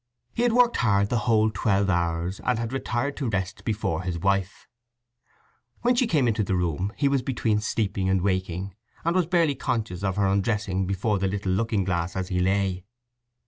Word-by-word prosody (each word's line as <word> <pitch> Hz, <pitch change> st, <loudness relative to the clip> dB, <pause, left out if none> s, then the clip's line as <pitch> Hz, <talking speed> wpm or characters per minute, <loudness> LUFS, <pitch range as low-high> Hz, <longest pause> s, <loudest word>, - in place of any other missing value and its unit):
He -, -, -2 dB
had 240 Hz, -1 st, +3 dB
worked 245 Hz, 0 st, +4 dB
hard 100 Hz, -4 st, +2 dB
the 120 Hz, -, +1 dB
whole 110 Hz, -1 st, +4 dB
twelve 100 Hz, -2 st, +1 dB
hours, 85 Hz, 0 st, -1 dB
and 125 Hz, -, +1 dB
had 115 Hz, +2 st, -3 dB
retired 135 Hz, +1 st, -2 dB
to 135 Hz, -5 st, -1 dB
rest 95 Hz, -1 st, -3 dB
before 105 Hz, -7 st, -1 dB
his 90 Hz, -2 st, -3 dB
wife. 100 Hz, +2 st, -1 dB, 1.2 s
When 245 Hz, +1 st, +4 dB
she 245 Hz, 0 st, +2 dB
came 145 Hz, -, +2 dB
into 110 Hz, -1 st, +1 dB
the 95 Hz, -1 st, -1 dB
room 90 Hz, +2 st, -1 dB
he 140 Hz, -, +2 dB
was 140 Hz, -1 st, +2 dB
between 115 Hz, -4 st, 0 dB
sleeping 100 Hz, -3 st, -1 dB
and 95 Hz, -2 st, +1 dB
waking, 95 Hz, 0 st, -1 dB, 0.3 s
and 170 Hz, +2 st, +1 dB
was 180 Hz, -3 st, +2 dB
barely 170 Hz, -4 st, +3 dB
conscious 110 Hz, -8 st, -3 dB
of 95 Hz, -2 st, 0 dB
her 100 Hz, -1 st, +1 dB
undressing 95 Hz, -1 st, 0 dB
before 100 Hz, +2 st, 0 dB
the 95 Hz, -, +1 dB
little 95 Hz, -1 st, -2 dB
looking 105 Hz, +1 st, +1 dB
glass 85 Hz, -1 st, -2 dB
as 95 Hz, -1 st, -3 dB
he 90 Hz, -, 0 dB
lay. 95 Hz, 0 st, 0 dB
100 Hz, 190 wpm, -25 LUFS, 95-120 Hz, 1.2 s, worked